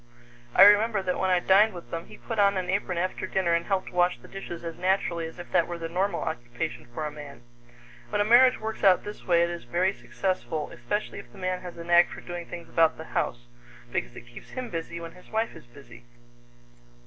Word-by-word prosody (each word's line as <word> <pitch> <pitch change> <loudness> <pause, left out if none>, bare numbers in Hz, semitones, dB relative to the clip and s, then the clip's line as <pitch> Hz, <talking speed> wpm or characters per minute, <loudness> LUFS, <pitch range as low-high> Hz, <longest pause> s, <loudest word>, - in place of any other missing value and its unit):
I - - +9
remember 205 0 +6
that 180 -1 -1
when 190 - +1
I 180 -1 +4
dined 195 +3 +4
with 175 - -10
them, 165 0 -5
he - - -12
put 225 -3 -5
on 200 -1 +4
an 185 -1 -1
apron 190 -2 -1
after 185 +2 -2
dinner 180 -3 +1
and 170 0 0
helped 195 -2 -1
wash 180 -2 +2
the 120 - -15
dishes 175 -3 -8
as 165 -1 -5
naturally 180 -3 0
as 165 - -12
if 175 - -10
that 165 - +3
were 175 - -5
the 165 -1 -4
normal 190 +4 0
occupation 120 +2 -4
for 155 +6 -4
a 150 - -3
man. 145 -3 -11 0.7
When 205 - -1
a 205 - +3
marriage 250 +3 +6
works 220 0 -5
out 190 -2 +5
this 210 0 -9
way, 170 -1 +4
it 170 - 0
is 170 -7 -7
very 180 +10 +1
successful, 185 -7 -3
especially 120 - -3
if - - -13
the - - -16
man 185 -1 -2
has 180 -2 -9
a 170 - -6
knack 175 +1 +5
for - - -9
doing 175 -1 -7
things 170 -1 -8
about 165 -1 +3
the 160 - -7
house, 120 0 -1 0.5
because 120 - -3
it 120 - -10
keeps 120 0 -13
him 255 -2 -6
busy 170 0 -4
when 165 0 -7
his 180 - -17
wife 220 -2 -1
is 160 -7 -13
busy. 120 -2 -15
175 Hz, 230 wpm, -27 LUFS, 165-195 Hz, 0.7 s, I